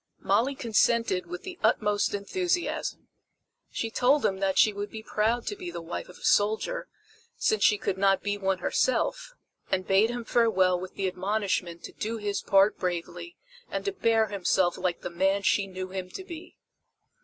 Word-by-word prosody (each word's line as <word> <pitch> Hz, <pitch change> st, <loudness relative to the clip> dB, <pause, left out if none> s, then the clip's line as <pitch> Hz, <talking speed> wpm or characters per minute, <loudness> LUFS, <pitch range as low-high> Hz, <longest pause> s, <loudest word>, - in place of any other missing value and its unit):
Molly 270 Hz, +4 st, +1 dB
consented 230 Hz, -5 st, +1 dB
with 360 Hz, +2 st, -7 dB
the 370 Hz, -3 st, -8 dB
utmost 205 Hz, -1 st, +2 dB
enthusiasm. 350 Hz, -, -2 dB, 0.6 s
She 225 Hz, -, -3 dB
told 260 Hz, +5 st, +3 dB
him 190 Hz, -1 st, 0 dB
that 195 Hz, -1 st, 0 dB
she 215 Hz, -, +5 dB
would 205 Hz, +1 st, -5 dB
be 220 Hz, -1 st, -8 dB
proud 225 Hz, +3 st, 0 dB
to 410 Hz, -, -3 dB
be 370 Hz, -3 st, -7 dB
the -, -, -6 dB
wife 170 Hz, +2 st, -6 dB
of 180 Hz, -, -13 dB
a -, -, -16 dB
soldier, 220 Hz, -, +1 dB, 0.5 s
since 440 Hz, -3 st, +1 dB
she 210 Hz, -, +5 dB
could 190 Hz, -1 st, -2 dB
not 195 Hz, -1 st, +3 dB
be 205 Hz, 0 st, 0 dB
one 195 Hz, -2 st, 0 dB
herself, -, -, 0 dB, 0.3 s
and 185 Hz, 0 st, 0 dB
bade 200 Hz, +3 st, +4 dB
him 240 Hz, -1 st, -4 dB
farewell 190 Hz, -7 st, +3 dB
with 185 Hz, 0 st, -8 dB
the 195 Hz, -, -1 dB
admonishment 185 Hz, -2 st, -2 dB
to -, -, -7 dB
do 225 Hz, +2 st, -4 dB
his 205 Hz, -2 st, -2 dB
part 195 Hz, +1 st, +3 dB
bravely 180 Hz, -, -4 dB, 0.3 s
and -, -, -4 dB
to 400 Hz, -, 0 dB
bear 225 Hz, -, +2 dB
himself 185 Hz, -2 st, +1 dB
like 180 Hz, -2 st, -2 dB
the -, -, -5 dB
man 195 Hz, +3 st, +1 dB
she 200 Hz, 0 st, +2 dB
knew 185 Hz, 0 st, -6 dB
him 185 Hz, -1 st, -5 dB
to 380 Hz, -, -7 dB
be. 340 Hz, -3 st, -10 dB
205 Hz, 180 wpm, -27 LUFS, 190-240 Hz, 0.6 s, she